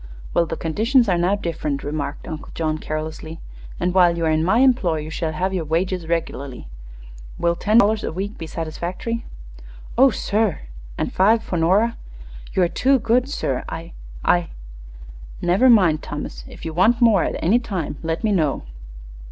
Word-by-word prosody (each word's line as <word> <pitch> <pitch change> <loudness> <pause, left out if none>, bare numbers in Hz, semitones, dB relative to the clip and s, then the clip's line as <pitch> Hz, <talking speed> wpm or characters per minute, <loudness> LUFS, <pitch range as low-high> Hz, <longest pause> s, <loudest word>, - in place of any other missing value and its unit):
"Well, 170 - +2
the 165 - -4
conditions 230 - +2
are 180 -3 +2
now 180 +4 +2
different," 160 -7 -3
remarked 145 0 -4
Uncle 155 -2 -7
John, 155 -1 -1
carelessly; 155 +1 -5 0.4
"and 180 - 0
while 175 -2 +4
you 165 - 0
are 160 - +2
in 155 0 +2
my 190 +7 +3
employ 240 -11 +3
you 155 +1 -7
shall 160 -1 -2
have 185 +5 -1
your 180 -3 -1
wages 170 +2 -1
regularly. 140 - -3 0.7
Will 170 0 +1
ten 210 +5 +2
dollars 215 -1 +4
a - - -2
week 195 +5 -4
be 165 - -7
satisfactory?" 175 +9 -4 0.7
"Oh, 270 +1 +8
sir!" 210 -4 0 0.4
"And - - -2
five 220 +4 +4
for - - -4
Nora." 195 +8 +2 0.6
"You 185 - +3
are - - +4
too 265 +10 +2
good, 245 +3 +1
sir. 135 - -2
I 165 +1 -7 0.3
I 175 -1 +2 0.5
" - - -15
"Never 200 +9 +5
mind, 180 -10 +5
Thomas. - - -6
If - - -11
you 160 - -4
want 215 +8 +3
more 220 -7 +5
at - - -2
any 210 +9 +3
time 185 -11 -4
let 160 +3 -3
me 215 - +2
know." 155 -8 +1
175 Hz, 175 wpm, -22 LUFS, 160-210 Hz, 0.7 s, Oh